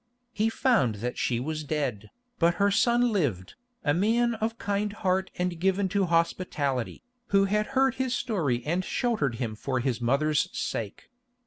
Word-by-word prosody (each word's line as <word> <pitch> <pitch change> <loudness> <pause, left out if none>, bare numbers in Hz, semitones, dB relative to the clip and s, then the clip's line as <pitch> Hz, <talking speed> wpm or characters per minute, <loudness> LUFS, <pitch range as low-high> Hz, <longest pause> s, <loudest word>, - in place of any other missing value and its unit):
He 220 +1 +1
found 225 - +2
that 120 +4 -4
she 120 -2 0
was 155 +4 -3
dead, 135 -9 -3 0.3
but 170 0 +3
her 200 0 +2
son 240 +3 +3
lived, 130 - -1 0.3
a 145 - +2
man 230 +7 +2
of 225 +1 -2
kind 205 0 -1
heart 190 -2 0
and 180 -2 -2
given 190 +2 +2
to 200 0 +1
hospitality, 165 -6 -1 0.2
who 195 -2 +4
had 210 +2 0
heard 265 -1 +4
his 255 -1 0
story 150 - -1
and 175 +4 0
sheltered 200 - 0
him 115 -2 -3
for 130 +4 -2
his 125 -2 -1
mother's 140 +5 +2
sake. 105 -3 -4
175 Hz, 160 wpm, -27 LUFS, 135-210 Hz, 0.3 s, who